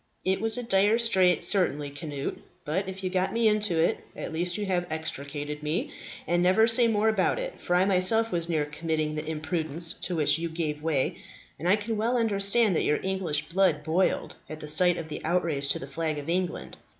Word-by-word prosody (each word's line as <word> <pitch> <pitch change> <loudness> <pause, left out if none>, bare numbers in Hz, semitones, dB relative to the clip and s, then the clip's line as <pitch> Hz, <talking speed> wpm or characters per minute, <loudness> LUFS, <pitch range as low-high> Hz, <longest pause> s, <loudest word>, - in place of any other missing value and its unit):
"It 190 +1 0
was 225 +1 +7
a 245 - -3
dire 205 0 +3
strait, 190 -7 +3
certainly, 150 -7 +2
Cnut. 145 -1 -5 0.3
But 185 +6 -2
if 190 0 -8
you 185 - -2
got 185 0 0
me 230 -1 +2
into 210 -5 +1
it, 165 - +1 0.2
at - - -6
least 175 +2 -1
you 210 - -3
have 180 -2 -1
extricated 150 -1 -5
me; 150 +3 -2 0.3
and 175 0 +1
never 185 +5 +4
say 230 +1 +4
more 215 -1 +1
about 215 - +1
it, - - -6
for 175 - 0
I 180 +1 +4
myself 200 +4 +2
was 170 -1 -2
near 155 -3 0
committing 155 0 -2
the 155 0 -4
imprudence 160 +1 -1
to 180 - -4
which 155 0 +2
you 170 0 -3
gave 155 -2 -3
way, 155 -4 -1 0.4
and 175 - -1
I 195 - +6
can 215 +1 -4
well 235 +4 0
understand 210 -2 +2
that - - +1
your 150 - +1
English 190 -6 -1
blood 170 -4 +2
boiled 170 +5 0 0.2
at 155 - -7
the 150 - -8
sight 175 +3 +4
of 165 - -6
the 155 - -7
outrage 160 -5 0
to - - +1
the - - -7
flag 155 +2 -3
of 145 0 -7
England. 180 +1 -3
175 Hz, 210 wpm, -27 LUFS, 155-195 Hz, 0.4 s, was